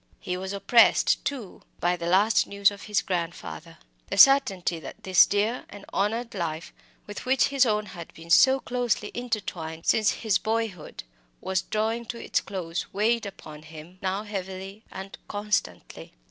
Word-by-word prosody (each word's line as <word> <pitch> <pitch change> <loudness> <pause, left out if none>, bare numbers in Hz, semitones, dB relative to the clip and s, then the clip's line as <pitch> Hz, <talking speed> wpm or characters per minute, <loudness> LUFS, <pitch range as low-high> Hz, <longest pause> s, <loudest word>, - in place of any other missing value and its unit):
He 180 - -4
was 190 +1 -5
oppressed, 200 +4 +4
too, 250 -10 -5 0.2
by 175 +1 +1
the 170 -1 -5
last 200 +5 +3
news 200 0 +3
of 200 0 -10
his 210 -1 0
grandfather. 170 - -5 0.3
The - - -3
certainty 200 -11 +5
that 215 +6 -10
this 185 -2 +6
dear 215 +4 0
and 200 0 -11
honoured 225 +4 -1
life, 165 -4 -4 0.3
with 205 - -8
which 265 0 +3
his 275 -2 +3
own 210 -1 0
had 170 -4 -10
been 165 +1 -10
so 265 +9 +6
closely 245 -5 -2
intertwined 190 -9 -4
since 215 -1 +3
his 215 -4 0
boyhood, 220 - -3 0.4
was 190 0 -1
drawing 225 +3 -2
to 235 +1 -6
its - - -1
close 175 -3 -5
weighed 220 +2 +1
upon 155 -6 -11
him 160 +3 -12
now 190 +2 -2
heavily 195 0 -6
and 190 +1 -9
constantly. 210 0 -3
200 Hz, 160 wpm, -26 LUFS, 180-220 Hz, 0.4 s, this